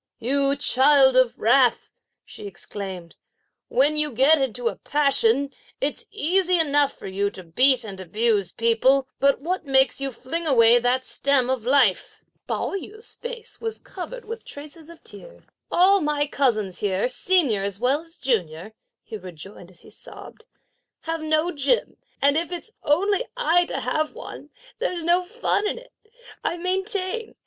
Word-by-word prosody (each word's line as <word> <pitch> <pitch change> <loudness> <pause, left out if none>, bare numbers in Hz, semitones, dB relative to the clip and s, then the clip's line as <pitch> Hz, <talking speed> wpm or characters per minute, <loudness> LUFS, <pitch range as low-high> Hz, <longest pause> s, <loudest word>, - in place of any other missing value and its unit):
"You 275 +3 +1
child 270 -1 +4
of 255 -2 +2
wrath," 245 +2 +2 0.3
she 205 - -10
exclaimed. 190 -2 -8 0.5
"When 285 +4 +3
you 300 -1 +6
get 275 +5 +5
into 245 -2 -2
a 200 - -2
passion, 275 -2 +1 0.3
it's 285 +2 -3
easy 365 +3 0
enough 290 -3 +3
for - - -12
you 195 +1 -2
to 190 -2 -11
beat 255 +10 +3
and 195 -3 -8
abuse 205 0 0
people; 255 +4 +2
but 275 -1 +2
what 345 0 -4
makes 270 0 +3
you 275 0 0
fling 275 +8 -3
away 235 -3 +6
that 250 +2 0
stem 270 -2 +1
of 245 -3 -4
life?" 255 -8 +1 0.2
Pao - - -3
yü's 430 +3 -7
face 475 -1 -8
was 450 -1 -4
covered 475 +7 -9
with 455 +2 -7
the - - -34
traces 305 +2 -11
of 335 - -15
tears. - - -14 0.2
"All 385 +2 +3
my 295 -1 0
cousins 215 -10 -1
here, 195 +1 -1
senior 260 - +1
as 200 0 -4
well 265 +5 0
as 330 +1 -18
junior," 190 -5 -3 0.3
he 220 - -8
rejoined, 185 0 -12
as 180 - -16
he - - -17
sobbed, 455 - -11 0.5
"have 325 0 -4
no 310 +2 +1
gem, 295 - -1 0.2
and 280 +2 +4
if 335 +2 -1
it's 355 +5 -7
only 395 +10 0
I 355 -8 +3
to - - -5
have 310 +5 -2
one, - - -10 0.3
there's 360 -8 -3
no 345 +2 +2
fun 420 +2 -2
in - - -3
it, - - -15 0.5
I 340 - -2
maintain! 385 +4 -3
280 Hz, 160 wpm, -23 LUFS, 230-345 Hz, 0.5 s, you